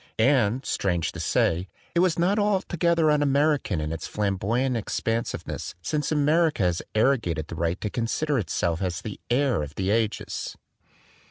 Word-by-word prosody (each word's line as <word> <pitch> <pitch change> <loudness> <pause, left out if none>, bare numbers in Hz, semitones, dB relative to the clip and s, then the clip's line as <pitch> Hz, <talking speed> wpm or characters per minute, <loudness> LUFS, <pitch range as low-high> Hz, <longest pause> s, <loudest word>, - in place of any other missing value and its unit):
And, 125 0 +3
strange 85 -4 0
to - - -8
say, 85 +3 +1 0.3
it 170 - +2
was 180 -2 +3
not 185 +5 +2
altogether 175 -5 +2
un 150 -1 +3
American 145 - +2
in 75 0 -3
its 80 0 -4
flamboyant 105 +6 0
ex 115 - -2
pensiveness, 115 -6 -3
since 150 - -1
America 155 - +2
has 90 -1 +1
arrogated 110 - +1
the - - -5
right 85 +2 -1
to 105 - -2
consider 135 +4 0
itself 85 -4 -1
as 90 -2 -2
the 105 -3 -6
heir 125 - +2
of 75 0 -6
the 95 +1 0
ages. 110 -1 -1
115 Hz, 160 wpm, -26 LUFS, 95-150 Hz, 0.3 s, And